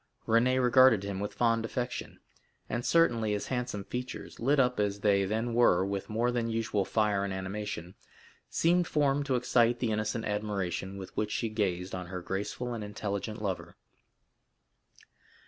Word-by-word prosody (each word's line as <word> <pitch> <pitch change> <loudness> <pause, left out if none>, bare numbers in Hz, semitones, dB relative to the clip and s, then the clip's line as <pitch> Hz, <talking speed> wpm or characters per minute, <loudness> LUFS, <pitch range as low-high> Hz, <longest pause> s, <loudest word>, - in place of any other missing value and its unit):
Renée 120 +3 +3
regarded 125 -4 +6
him 100 -1 -4
with 105 +1 -3
fond 115 0 +2
affection; 125 +2 -4 0.5
and 120 - -2
certainly 120 -11 +3
his 105 - -2
handsome 125 -5 -2
features, 125 +5 -6
lit 140 +5 +2
up 125 -2 +2
as 100 -1 0
they 100 -2 +3
then 110 +4 -1
were 95 -6 +4
with 100 0 -3
more 115 +3 +1
than 120 -1 -1
usual 110 -3 0
fire 105 -3 +1
and 100 - -2
animation, 95 -2 -5 0.6
seemed 175 +1 +2
formed 145 -1 +1
to 130 - +2
excite 120 -1 +3
the 120 -2 -1
innocent 110 +1 -1
admiration 100 -2 -2
with 95 -1 -9
which 105 0 -1
she 115 +1 -1
gazed 95 -4 -1
on 90 -1 -4
her 90 0 -6
graceful 105 +6 -3
and 115 -2 -4
intelligent 105 +1 -4
lover. 95 -3 -3
110 Hz, 160 wpm, -30 LUFS, 100-120 Hz, 0.6 s, regarded